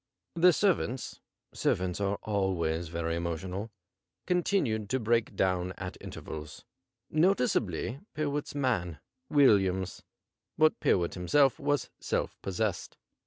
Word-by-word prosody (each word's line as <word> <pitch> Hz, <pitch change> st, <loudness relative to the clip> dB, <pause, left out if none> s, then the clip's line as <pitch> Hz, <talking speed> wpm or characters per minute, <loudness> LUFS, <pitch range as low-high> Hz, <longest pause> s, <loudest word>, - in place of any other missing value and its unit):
The 175 Hz, +2 st, +6 dB
servants 165 Hz, -, 0 dB, 0.3 s
(servants 90 Hz, +1 st, 0 dB
are 100 Hz, 0 st, 0 dB
always 85 Hz, -5 st, 0 dB
very 85 Hz, 0 st, -2 dB
emotional) 90 Hz, +5 st, -3 dB, 0.6 s
continued 165 Hz, -, +1 dB
to 130 Hz, -, +1 dB
break 115 Hz, 0 st, +1 dB
dawn 90 Hz, -1 st, 0 dB
at 90 Hz, -1 st, -6 dB
inter -, -, -8 dB
vals, 75 Hz, 0 st, -8 dB, 0.5 s
noticeably 135 Hz, -, +1 dB, 0.2 s
Pyrwhit's 145 Hz, -1 st, -2 dB
man, 105 Hz, -, 0 dB, 0.3 s
Williams, 95 Hz, -10 st, +3 dB, 0.6 s
but 155 Hz, 0 st, +4 dB
Pyrwhit 85 Hz, -2 st, +2 dB
himself 135 Hz, +10 st, +3 dB
Avas 145 Hz, -2 st, 0 dB
self -, -, -2 dB
possessed. 95 Hz, 0 st, -2 dB
100 Hz, 110 wpm, -30 LUFS, 90-140 Hz, 0.6 s, The